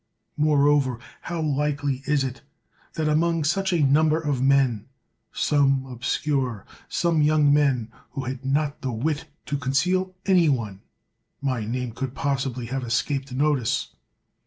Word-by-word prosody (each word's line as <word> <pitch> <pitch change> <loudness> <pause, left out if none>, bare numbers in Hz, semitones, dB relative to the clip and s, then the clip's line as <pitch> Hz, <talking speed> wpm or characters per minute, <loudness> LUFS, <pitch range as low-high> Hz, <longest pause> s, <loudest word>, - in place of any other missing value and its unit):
Moreover, 145 -4 +3 0.3
how 170 -2 -2
likely 145 -2 0
it 135 - -18 0.2
is, 130 0 -5 0.5
that 155 -2 -1
among 165 +1 +2
such 190 +5 +1
a 170 -4 +2
number 155 +3 +3
of 145 -5 -1
men, 135 -5 +2 0.4
some 135 -2 +2
obscure, 125 -2 -2 0.2
some 170 -3 +1
young 150 -1 +4
men 135 -6 +2 0.2
who 135 - -3
had 130 +1 -5
not 145 +2 -1
the 130 - -2
wit 145 +7 -2 0.2
to 145 - -2
conceal 180 +8 0
any 180 -5 +4
one, 110 -8 -2 0.6
my 130 -6 -2
name 125 +2 -3
could 130 +2 -5
possibly 135 -3 -2
have 130 +2 -3
escaped 135 +3 -1
notice? 135 -2 0
140 Hz, 135 wpm, -24 LUFS, 130-150 Hz, 0.6 s, young